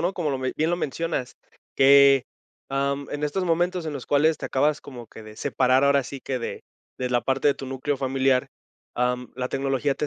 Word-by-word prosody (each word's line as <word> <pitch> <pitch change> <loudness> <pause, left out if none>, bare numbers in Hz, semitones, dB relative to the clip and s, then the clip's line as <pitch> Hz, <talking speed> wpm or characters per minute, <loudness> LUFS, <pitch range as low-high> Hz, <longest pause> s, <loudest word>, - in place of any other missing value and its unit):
¿no? 175 +3 0
Como 165 -6 -2
lo 135 - -2
me 130 0 -2
bien 160 +2 +1
lo 175 - +1
mencionas. 160 -4 -3 0.4
Que, 140 -1 +6 0.4
am, 140 +1 -1
en 145 - -4
estos 180 +6 -1
momentos, 175 +1 0
en 155 - -3
los 135 -3 -7
cuales, 150 +2 +3
te - - -4
acabas 145 +3 +1
como 120 -4 -10
que 110 - -12
de 110 0 -12
separar, 130 0 +2
ahora 140 -1 +4
sí 135 +1 -8
que, 130 -2 -3
de 115 - -6 0.4
de 125 -1 -2
la 120 -1 +2
parte 135 +4 0
de - - +5
tu 135 - -8
núcleo 135 +1 -3
familiar, 135 -1 +1 0.5
am, 125 0 -1
la 125 0 -2
tecnología 135 +1 0
te 150 - -2
135 Hz, 215 wpm, -24 LUFS, 130-150 Hz, 0.5 s, Que